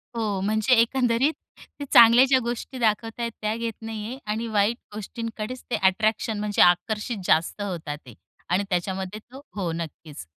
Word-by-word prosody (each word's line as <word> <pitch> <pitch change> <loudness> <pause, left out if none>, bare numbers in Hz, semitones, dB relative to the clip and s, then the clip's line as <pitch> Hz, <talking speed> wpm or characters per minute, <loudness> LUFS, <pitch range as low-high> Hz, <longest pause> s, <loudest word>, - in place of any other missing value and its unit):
हो. 215 -4 -1
म्हणजे 215 +5 +2
एकंदरीत 245 +3 +2 0.5
ते 285 - -4
चांगल्या 235 +2 +8
ज्या 265 -1 +4
गोष्टी 240 +2 -5
दाखवत 225 0 0
आहेत. 235 0 -2
त्या 215 0 -1
घेत 230 0 -3
नाही 220 -1 -6
आहे 250 +3 -6
आणि 225 +2 -2
वाईट 215 +1 +1 0.2
गोष्टींकडेच 230 +3 -6
ते 245 - 0
अट्रॅक्शन, 215 +3 +1
म्हणजे 210 -1 0
आकर्षित 210 +6 +2
जास्त 165 +6 +2
होतात 170 -7 -4
ते 125 - -12 0.4
आणि 180 +3 +2
त्याच्यामध्ये 190 +2 -2
तो 265 +2 -10
हो. 185 -5 -2
नक्कीच. 160 - -7
215 Hz, 160 wpm, -25 LUFS, 190-235 Hz, 0.5 s, चांगल्या